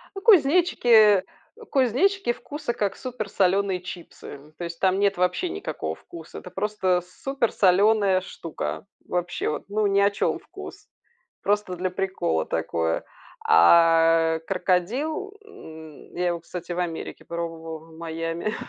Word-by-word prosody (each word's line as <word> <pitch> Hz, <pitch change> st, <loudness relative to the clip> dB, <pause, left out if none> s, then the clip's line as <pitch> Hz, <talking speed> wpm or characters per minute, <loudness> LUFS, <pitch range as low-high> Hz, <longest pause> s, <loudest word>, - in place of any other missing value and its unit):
Ну, 390 Hz, -, -5 dB
кузнечики 275 Hz, -, +5 dB, 0.5 s
кузнечики 270 Hz, -, +2 dB
вкуса 290 Hz, 0 st, -5 dB
как 205 Hz, -4 st, -2 dB
супер 250 Hz, -5 st, -5 dB
соленые 195 Hz, -1 st, +1 dB
чипсы, 180 Hz, -1 st, -10 dB
м. 145 Hz, +2 st, -11 dB
То 175 Hz, -, -4 dB
есть, 170 Hz, 0 st, -7 dB
там 190 Hz, 0 st, +2 dB
нет 200 Hz, 0 st, +2 dB
вообще 180 Hz, 0 st, 0 dB
никакого 80 Hz, 0 st, -4 dB
вкуса. 165 Hz, -, -11 dB
Это 180 Hz, -, -10 dB
просто 190 Hz, -2 st, 0 dB, 0.2 s
супер 270 Hz, -4 st, 0 dB
соленая 195 Hz, 0 st, +4 dB
штука. 165 Hz, -, -6 dB, 0.2 s
Вообще, 180 Hz, 0 st, -2 dB
вот, 150 Hz, -, -3 dB
ну 210 Hz, +1 st, 0 dB
ни 200 Hz, 0 st, +3 dB
о 200 Hz, 0 st, +4 dB
чем 200 Hz, -, -1 dB
вкус. -, -, -11 dB, 0.5 s
Просто 205 Hz, -3 st, 0 dB
для 185 Hz, +1 st, -2 dB
прикола 185 Hz, -, -1 dB
такое. 80 Hz, 0 st, -1 dB, 0.4 s
А 165 Hz, -, +5 dB
крокодил, 250 Hz, -, -1 dB
м, 160 Hz, -, -13 dB
я 180 Hz, 0 st, +1 dB
его, 170 Hz, -1 st, -2 dB
кстати, 175 Hz, +1 st, -7 dB
в 175 Hz, -, -4 dB
Америке 170 Hz, -2 st, -5 dB
пробовала, 165 Hz, -1 st, -5 dB
в -, -, -14 dB
Майами. 165 Hz, +4 st, -3 dB
185 Hz, 140 wpm, -25 LUFS, 165-215 Hz, 0.5 s, кузнечики